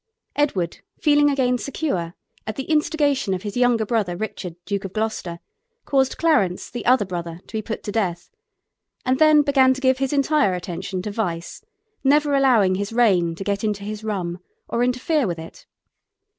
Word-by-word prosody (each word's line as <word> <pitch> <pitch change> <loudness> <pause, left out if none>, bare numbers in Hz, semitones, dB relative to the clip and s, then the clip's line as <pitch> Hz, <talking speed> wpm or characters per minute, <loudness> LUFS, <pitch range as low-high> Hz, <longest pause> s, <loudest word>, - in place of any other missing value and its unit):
Edward, 195 - 0 0.2
feeling 290 -1 +4
again 250 -3 +1
secure, 210 - -3 0.3
at 215 - -3
the 270 - -3
instigation 290 -7 +1
of 180 - -7
his 205 -1 -5
younger 245 -3 +3
brother, 205 -6 0
Richard, 185 -4 -5
Duke 200 -2 -2
of 195 -1 -6
Gloucester, 215 -6 -3 0.5
caused 265 -2 +1
Clarence, 205 - +1
the 240 - -5
other 250 -4 +4
brother, 170 -2 -5
to - - -17
be 220 - -1
put 220 +1 -5
to 205 - -4
death, 185 -6 -2 0.7
and 255 +1 +1
then 310 -1 +6
began 265 -2 +4
to - - -6
give 260 -1 +2
his 270 -1 0
entire 285 -7 +2
attention 180 +1 -5
to 210 - -4
vice, 175 -6 -4 0.4
never 290 +1 +3
allowing 245 -9 +4
his 200 +2 -2
reign 190 -8 +3
to 195 - -6
get 200 +1 -2
into 210 -2 -1
his 210 +1 -6
rum 185 -5 -3 0.3
or 235 - 0
interfere 250 +2 +1
with 170 -2 -3
it. 160 0 -11
220 Hz, 175 wpm, -22 LUFS, 185-270 Hz, 0.7 s, then